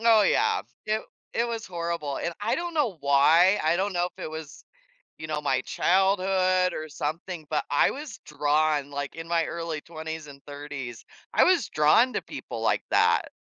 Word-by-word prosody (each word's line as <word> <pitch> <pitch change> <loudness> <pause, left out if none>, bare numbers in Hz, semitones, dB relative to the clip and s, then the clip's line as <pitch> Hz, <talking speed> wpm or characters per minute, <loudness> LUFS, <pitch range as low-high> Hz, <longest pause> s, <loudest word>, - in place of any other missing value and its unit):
Oh 225 -2 +6
yeah, - - +2 0.2
it 215 0 0 0.3
it 235 - +1
was 230 -1 -4
horrible, 170 -5 -3
and 170 - -3
I 215 +3 0
don't 345 -1 -4
know 245 - +1
why, 155 +7 +5
I 160 +2 +2
don't 195 +2 -1
know 175 0 +1
if - - -10
it - - -4
was, 160 -2 -9 0.5
you 155 - -6
know, 155 -1 -2
my 135 -3 +1
childhood 185 -1 +2
or 155 0 -5
something, 155 +2 -5
but 155 - 0
I 145 - +4
was 285 -4 -7
drawn, 150 -1 +1
like, 145 0 -4
in 165 0 -7
my 170 -1 +2
early 165 -3 -4
20s 160 -1 -7
and 140 -1 -13
30s, 140 -5 -7 0.3
I - - +6
was 365 -1 +3
drawn 155 +12 +4
to - - -1
people - - -7
like - - +1
that, - - +3
165 Hz, 185 wpm, -26 LUFS, 150-190 Hz, 0.5 s, Oh